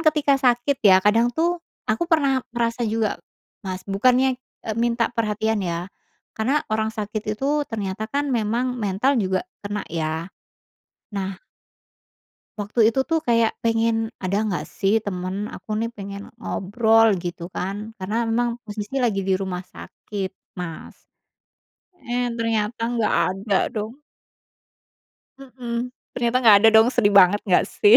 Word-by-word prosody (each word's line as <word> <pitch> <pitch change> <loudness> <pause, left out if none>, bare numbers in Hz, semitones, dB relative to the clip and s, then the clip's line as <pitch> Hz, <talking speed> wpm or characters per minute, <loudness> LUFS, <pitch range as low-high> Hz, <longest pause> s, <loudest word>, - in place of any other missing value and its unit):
ketika 300 -4 +3
sakit 250 +2 +2
ya 195 -3 +7
kadang 225 +3 +4
tuh 335 +7 0 0.2
aku 225 +11 -1
pernah 280 -6 +3 0.2
ngerasa 235 0 0
juga, 220 -1 -1 0.4
Mas 185 0 -5
bukannya, 250 +6 +2 0.2
eee, 220 -1 -3
minta 235 0 +1
perhatian 220 -1 0
ya, 170 -2 -2 0.5
karena 260 +7 +1
orang 220 0 0
sakit 215 0 -3
itu 285 +7 0
ternyata 210 -5 -4
kan 285 +1 0
memang 245 +1 0
mental 215 +5 +1
juga 190 -2 0 0.2
kena 205 +1 -2
ya, 160 +1 -3 0.9
nah 195 -2 -4 1.2
waktu 205 +3 -2
itu 230 +4 +1
tuh 325 0 +3
kayak 230 -1 +3
pengen, 230 0 +2 0.3
"Ada 185 +1 0
nggak 180 - -2
sih 195 0 +2
temen 185 -2 -3 0.2
aku - - -12
nih 230 +1 -1
pengen 200 0 -7 0.2
ngobrol" 225 +3 +3 0.2
gitu 175 -1 -5
kan 190 +2 -2 0.3
karena 195 +4 -2
memang 240 +1 +1
posisi 210 +3 -5
lagi 200 -5 +1
di 190 - +4
rumah 185 -2 -3
sakit 195 -3 -6 0.3
Mas, 165 -3 -7 1.1
eh, 245 +1 0
ternyata 225 -1 -1
nggak 230 -3 +1 0.2
ada 195 +1 -1 0.2
dong. 220 +5 -4 1.4
Mhm, 250 -2 -5 0.2
ternyata 240 0 +1
gak 220 -5 +8
ada - - +10
dong 220 +1 +7
sedih 240 -5 +2
banget 200 +1 +6
gak 185 -3 +4
sih? 210 +3 +6
220 Hz, 135 wpm, -23 LUFS, 200-245 Hz, 1.4 s, ada